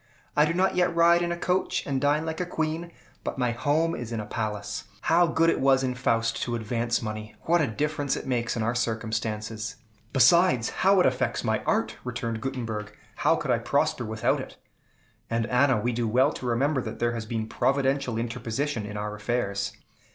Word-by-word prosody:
I 150 - +5
do 160 - 0
not 190 +2 +2
yet 180 -1 +2
ride 170 +1 +5
in 175 0 -1
a 170 - -2
coach, 180 +2 0
and 135 -2 -1
dine 145 +2 +2
like 160 +2 -3
a - - 0
queen, 160 +1 -2 0.3
but - - -4
my 125 -2 +1
home 150 +7 +1
is 120 -1 -5
in 115 - -2
a 105 - -4
palace. 105 -1 -4 0.2
How 175 +1 +4
good 165 0 +3
it - - -1
was 135 0 +4
in 130 -1 0
Faust 115 -2 0
to 120 - -1
advance 115 +1 -1
money! 110 0 -5
What 170 0 +3
a 145 - +2
difference 145 +3 -1
it - - -6
makes 120 -2 -1
in 110 - 0
our 115 +2 +1
circumstances!" 110 -1 -2 0.4
"Besides, 135 -1 +4
how 195 0 +5
it - - +3
affects - - 0
my - - 0
art!" - - +1
returned 115 -2 -3
Gutenberg. 115 -5 -4 0.3
"How - - +3
could - - -2
I - - +3
prosper - - 0
without 110 -1 0
it? - - -10 0.7
And, 115 0 0
Anna, 125 0 +3
we 120 +4 0
do 120 -1 -1
well 125 +4 +3
to 125 - -6
remember 130 +4 +1
that - - -6
there 120 0 +1
has 115 -2 -5
been 115 -1 -2
providential 135 0 0
interposition 115 +1 -2
in 105 0 -6
our 105 0 -3
affairs. 105 -2 -2
120 Hz, 200 wpm, -27 LUFS, 110-145 Hz, 0.7 s, I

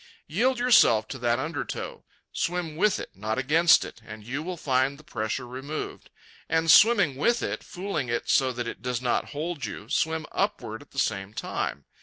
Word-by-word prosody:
Yield 245 - +1
yourself 220 - +5
to 130 - -7
that 120 0 +1
undertow. 150 +3 -4 0.3
Swim 170 -3 -2
with 205 +4 +2
it, - - -7
not 110 +3 -3
against 155 +6 +5
it, - - -11
and 110 -1 -10
you 135 +6 -3
will 180 +2 -5
find 135 -1 +1
the 155 - -16
pressure 115 -1 -3
removed. 135 +5 -6 0.4
And, 165 0 +3
swimming 200 - +6
with 235 - +2
it, - - -3
fooling 180 -9 -4
it 120 - -2
so 130 -1 +3
that 120 -1 -4
it - - -6
does 125 -1 -2
not 125 -1 0
hold 155 +1 -4
you, - - -7
swim 160 0 0
upward 195 - -2
at 145 - -16
the - - -16
same 100 -4 -1
time. 70 -8 -3
140 Hz, 185 wpm, -26 LUFS, 120-170 Hz, 0.4 s, swimming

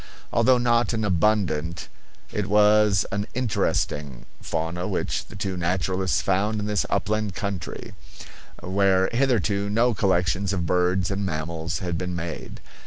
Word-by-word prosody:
Although 125 +2 +4
not 120 -1 +2
an 110 -1 -1
abundant, 85 -5 0 0.4
it - - -2
was 105 -2 +4
an 100 +1 -2
interesting, 75 - -1 0.2
fauna 85 +2 -3
which - - -2
the - - -12
two 95 -1 -3
naturalists 95 +2 0
found 105 +3 +1
in 105 - -3
this 105 -2 0
upland 105 -2 -1
country, 100 -5 -5 0.7
where 95 0 +2
hitherto 105 - +1
no 115 +3 +3
collections 95 0 +1
of 90 -3 -1
birds 90 +2 +1
and 100 +1 -2
mammals 80 -1 -3
had 85 -1 -2
been 90 -1 -3
made. 85 -2 -6
95 Hz, 135 wpm, -24 LUFS, 90-105 Hz, 0.7 s, Although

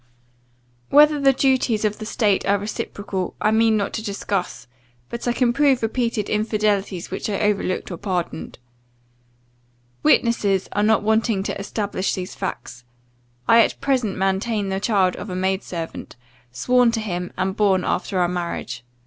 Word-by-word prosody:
Whether 300 +1 +6
the 275 -1 +5
duties 255 -5 +1
of 210 0 -1
the 215 - -6
state 210 -4 +1
are 200 +1 +3
reciprocal, 200 -2 -4
I 215 - +2
mean 220 0 +3
not 200 - -2
to 220 - -3
discuss; 200 - -3 0.4
but 235 +1 -5
I - - +3
can 240 0 +1
prove 275 -3 +3
repeated 230 -2 -1
infidelities 210 -4 -1
which - - -3
I 200 - -1
overlooked 200 -3 0
or 175 - -5
pardoned. 180 -3 -4 1.4
Witnesses 200 - +2
are 205 - 0
not 215 0 +3
wanting 220 -2 +1
to 200 - -4
establish 200 -1 -2
these 185 -1 -5
facts. 125 -9 -6 0.6
I 230 0 +7
at - - 0
present 255 -7 0
maintain 195 +2 0
the 190 0 -1
child 195 -4 +2
of 200 +3 -7
a 180 - -4
maid 190 +1 0
servant, 165 -3 -7 0.4
sworn 245 - +3
to 230 - 0
him, 180 -4 -4
and 190 +1 -1
born 195 -4 +2
after 190 +1 -1
our 175 - +3
marriage. 170 -9 -4
205 Hz, 155 wpm, -22 LUFS, 190-225 Hz, 1.4 s, I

